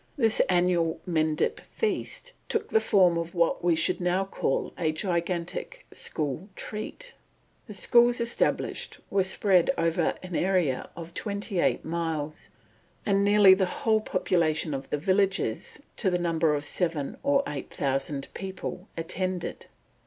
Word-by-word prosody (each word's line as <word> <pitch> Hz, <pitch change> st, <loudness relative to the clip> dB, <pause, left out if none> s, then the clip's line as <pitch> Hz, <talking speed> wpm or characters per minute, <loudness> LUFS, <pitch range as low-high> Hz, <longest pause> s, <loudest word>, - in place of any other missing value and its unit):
This 225 Hz, -5 st, +3 dB
annual 175 Hz, -2 st, +2 dB
"Mendip 155 Hz, -3 st, +1 dB
feast" 465 Hz, +2 st, -3 dB, 0.2 s
took -, -, -1 dB
the 445 Hz, -, +4 dB
form 185 Hz, -, +4 dB
of 170 Hz, +2 st, -5 dB
what 170 Hz, -1 st, +1 dB
we 175 Hz, -1 st, +3 dB
should 160 Hz, +3 st, +1 dB
now 180 Hz, +2 st, +1 dB
call 165 Hz, -7 st, -2 dB
a 160 Hz, -3 st, 0 dB
gigantic 175 Hz, -, -3 dB
school 155 Hz, -, -2 dB
treat. 475 Hz, -, -6 dB, 0.5 s
The 210 Hz, -, -8 dB
schools 240 Hz, +3 st, +4 dB
established 235 Hz, 0 st, -1 dB
were 195 Hz, -, +3 dB
spread 190 Hz, -1 st, +3 dB
over 165 Hz, 0 st, +1 dB
an 180 Hz, -2 st, -6 dB
area 175 Hz, -8 st, +1 dB
of 170 Hz, +1 st, -8 dB
twenty 200 Hz, -2 st, -3 dB
eight -, -, +1 dB
miles, 160 Hz, -2 st, -3 dB, 0.6 s
and 200 Hz, -1 st, +2 dB
nearly 205 Hz, -1 st, +7 dB
the 190 Hz, -1 st, +2 dB
whole 220 Hz, +3 st, +1 dB
population 160 Hz, -6 st, +1 dB
of 135 Hz, 0 st, -5 dB
the -, -, 0 dB
villages, 190 Hz, -, 0 dB, 0.2 s
to 200 Hz, -, +2 dB
the 180 Hz, -, +1 dB
number 165 Hz, -3 st, +1 dB
of 145 Hz, -, -3 dB
seven 160 Hz, -4 st, -2 dB
or 280 Hz, 0 st, +3 dB
eight 140 Hz, -3 st, -6 dB
thousand 135 Hz, 0 st, -1 dB
people, 190 Hz, 0 st, -6 dB
attended. 180 Hz, +2 st, -3 dB
180 Hz, 140 wpm, -27 LUFS, 160-195 Hz, 0.6 s, nearly